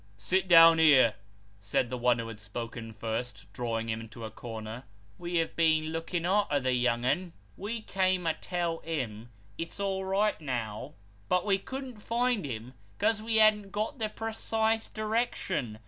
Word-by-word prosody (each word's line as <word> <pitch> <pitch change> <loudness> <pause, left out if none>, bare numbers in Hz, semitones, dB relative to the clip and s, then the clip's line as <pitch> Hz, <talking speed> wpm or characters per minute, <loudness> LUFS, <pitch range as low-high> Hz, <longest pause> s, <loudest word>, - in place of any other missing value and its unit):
" 100 - -29
Sit 185 - 0
down 165 -2 +8
here," 140 -8 +6 0.5
said 100 +5 -1
the 125 - -2
one 120 0 +3
who 115 -1 -4
had 110 -2 -8
spoken 115 +2 -6
first, 110 0 -4
drawing 115 -1 -2
him 110 0 -2
into 115 0 -9
a 110 - -7
corner. 110 +1 -7 0.4
"We 175 0 -4
have 165 -1 0
been 160 -1 +2
looking 165 +1 -2
arter 190 -6 +2
the 130 -1 0
young 120 -1 +1
un. 175 +6 0 0.2
We 220 +3 -4
came 185 -2 +1
to 165 - +2
tell 170 -2 -2
him, 120 -8 -4 0.3
it's 165 +4 -5
all 195 -1 -1
right 195 0 +1
now, 120 -7 -4 0.3
but 180 +1 +2
we 195 -2 +2
couldn't 265 0 -7
find 235 -4 0
him 120 -1 -6 0.2
'cause 220 - +1
we 225 0 -1
hadn't 215 -2 +5
got 215 +5 -3
the 215 -1 -1
precise 225 0 -1
direction. 215 - -2
165 Hz, 170 wpm, -29 LUFS, -, 0.5 s, down